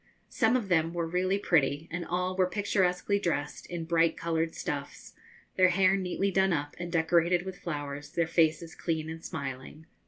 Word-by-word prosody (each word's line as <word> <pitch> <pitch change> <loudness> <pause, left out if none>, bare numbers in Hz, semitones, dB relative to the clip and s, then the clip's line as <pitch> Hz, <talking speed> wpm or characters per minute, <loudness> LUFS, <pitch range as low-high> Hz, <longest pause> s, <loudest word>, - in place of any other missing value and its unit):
Some 225 +3 +3
of 225 -5 -4
them 165 -2 +1
were 170 -1 0
really 180 +3 0
pretty, 155 -5 +1
and 175 +1 -3
all 180 +2 -2
were 185 -1 +3
picturesquely 200 -1 +1
dressed 165 -6 -2
in 170 -2 -5
bright 165 0 +2
coloured 165 -1 -1
stuffs, 140 -1 -5 0.4
their 185 0 +6
hair 185 +1 +4
neatly 195 +1 -1
done 190 0 +3
up 145 -1 -3
and 175 0 -5
decorated 170 +1 +2
with 190 -1 -7
flowers, 145 -3 -5
their 170 +2 0
faces 160 0 +1
clean 160 -2 -3
and 165 0 -8
smiling. 140 +1 -6
170 Hz, 175 wpm, -29 LUFS, 160-185 Hz, 0.4 s, their